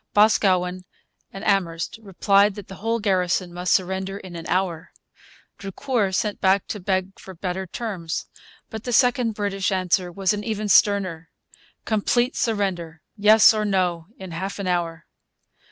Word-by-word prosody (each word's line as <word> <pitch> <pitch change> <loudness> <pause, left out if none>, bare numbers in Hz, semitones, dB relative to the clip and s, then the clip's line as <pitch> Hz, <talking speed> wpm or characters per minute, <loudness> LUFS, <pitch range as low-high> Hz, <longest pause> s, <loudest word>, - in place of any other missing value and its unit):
Boscawen 185 -4 +3 0.5
and 195 +2 -8
Amherst 175 -2 0
replied 200 0 +2
that 205 - -9
the 190 - -10
whole 225 +3 -1
garrison 185 -3 0
must 180 +1 -2
surrender 190 +1 0
in 185 -3 -10
an 165 -1 -7
hour. 180 -3 -1 0.7
Drucour 200 +1 -1
sent 205 +2 -2
back 190 0 +3
to 210 - -4
beg 190 0 -2
for 190 - -11
better 185 +2 -4
terms. 180 -6 -4 0.5
But 220 -1 -6
the 245 - -3
second 245 -2 +3
British 200 -2 -1
answer 185 -1 0
was 195 +2 0
even 210 0 -3
sterner 185 -5 +3 0.6
complete 240 +4 +1
surrender, 180 -7 -2
yes 215 +1 +6
or 215 -1 -1
no, 180 -5 0
in 190 -2 -9
half 190 +4 -4
an 200 - -4
hour. 170 -2 -2
195 Hz, 145 wpm, -23 LUFS, 180-210 Hz, 0.7 s, yes